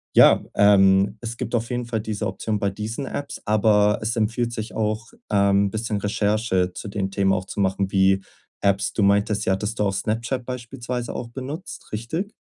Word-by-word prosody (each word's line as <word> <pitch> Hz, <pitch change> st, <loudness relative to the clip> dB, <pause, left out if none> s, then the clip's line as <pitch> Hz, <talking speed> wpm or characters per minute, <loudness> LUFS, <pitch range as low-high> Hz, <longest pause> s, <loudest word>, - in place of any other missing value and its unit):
ja, -, -, +7 dB
ähm, 95 Hz, -1 st, +5 dB
es 115 Hz, 0 st, -5 dB
gibt 120 Hz, -, -3 dB
auf 115 Hz, 0 st, -1 dB
jeden 125 Hz, 0 st, -2 dB
Fall 115 Hz, -1 st, -2 dB
diese 105 Hz, 0 st, -3 dB
Option 105 Hz, +3 st, -2 dB
bei 100 Hz, -, +1 dB
diesen 110 Hz, +7 st, -5 dB
Apps. 140 Hz, +1 st, -5 dB
Aber 105 Hz, -1 st, +3 dB
es 110 Hz, +3 st, -1 dB
empfiehlt 115 Hz, +2 st, 0 dB
sich 110 Hz, 0 st, -5 dB
auch, 110 Hz, +1 st, -1 dB, 0.2 s
ähm, 100 Hz, -1 st, +3 dB
bisschen 110 Hz, 0 st, -2 dB
Recherche 105 Hz, -2 st, 0 dB
zu -, -, -7 dB
den 100 Hz, -1 st, -3 dB
Themen 95 Hz, -1 st, +2 dB
auch 95 Hz, -1 st, -1 dB
zu 100 Hz, -, -7 dB
machen, 95 Hz, 0 st, 0 dB
wie 95 Hz, 0 st, +3 dB, 0.4 s
Apps. 100 Hz, 0 st, +1 dB
Du 105 Hz, -, +1 dB
meintest, 100 Hz, +1 st, +2 dB
ja, 95 Hz, -, +3 dB
hattest 105 Hz, +4 st, -3 dB
du -, -, +3 dB
auch 100 Hz, -1 st, +1 dB
Snapchat 115 Hz, +6 st, -2 dB
beispielsweise 125 Hz, -1 st, -5 dB
auch 115 Hz, -, -5 dB
benutzt, 135 Hz, +8 st, -7 dB
richtig? 160 Hz, -, -3 dB
105 Hz, 190 wpm, -23 LUFS, 100-115 Hz, 0.4 s, ja